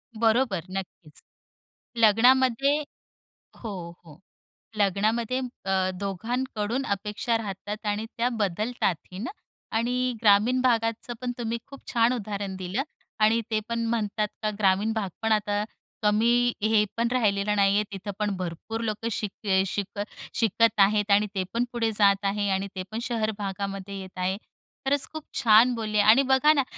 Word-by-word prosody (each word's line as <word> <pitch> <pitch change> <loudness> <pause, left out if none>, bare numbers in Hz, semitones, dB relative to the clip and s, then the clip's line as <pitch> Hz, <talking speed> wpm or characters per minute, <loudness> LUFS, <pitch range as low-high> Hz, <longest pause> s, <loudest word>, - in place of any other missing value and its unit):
बरोबर. 225 -4 +2
नक्कीच. 185 -5 -7 0.8
लग्नामध्ये 250 +5 +4 0.8
हो, 225 - -7 0.3
हो. 155 -1 -15 0.6
लग्नामध्ये 215 +5 +1
म 255 - -3 0.2
अ, 190 -1 +1
दोघांकडून 225 +4 -2
अपेक्षा 210 +3 -1
राहतात 210 0 -6
आणि 210 +2 -1
त्या 240 +2 +2
बदलतातही 205 -4 -2
ना. 245 - -4 0.5
आणि 250 +2 0
ग्रामीण 220 +4 +4
भागाचं 230 -1 0
पण 250 -1 -2
तुम्ही 235 -1 -2
खूप 275 -1 -11
छान 235 +1 +4
उदाहरण 205 -4 -4
दिलं 185 +7 -2 0.4
आणि 225 +2 +4
ते 215 - +2
पण 235 0 -1
म्हणतात 215 -2 -1 0.2
का 215 - +2
ग्रामीण 200 +2 +2
भाग 210 -4 -2
पण 225 0 0
आता 205 -1 +1 0.4
कमी 235 +3 +3
हे 215 0 +4
पण 235 0 +2
राहिलेला 210 -4 +1
नाही 200 -1 +4
आहे. 210 - +3
तिथं 200 +1 -5
पण 210 -2 0
भरपूर 185 +6 -5
लोकं 220 0 -2
शिक 210 -2 -3
ए 190 -1 +3
शिक 200 +1 -4
अ, - - +1 0.3
शिकत 225 -1 +2
आहेत 205 +1 +4
आणि 205 +1 +4
ते 190 - 0
पण 235 +1 +1
पुढे 230 -2 0
जात 200 -1 +3
आहेत 200 0 0
आणि 190 +1 -1
ते 185 - -3
पण 220 - -3
शहर 225 -3 -1
भागामध्ये 195 0 -4
येत 190 -1 -10
आहेत. 185 +2 -1 0.5
खरंच 270 0 +2
खूप 315 -1 -6 0.2
छान 230 +2 +6
बोलले 215 -2 -1
आणि 215 +5 +6
बघा 265 +3 +4
ना, 280 -3 +2
215 Hz, 155 wpm, -26 LUFS, 200-235 Hz, 0.8 s, छान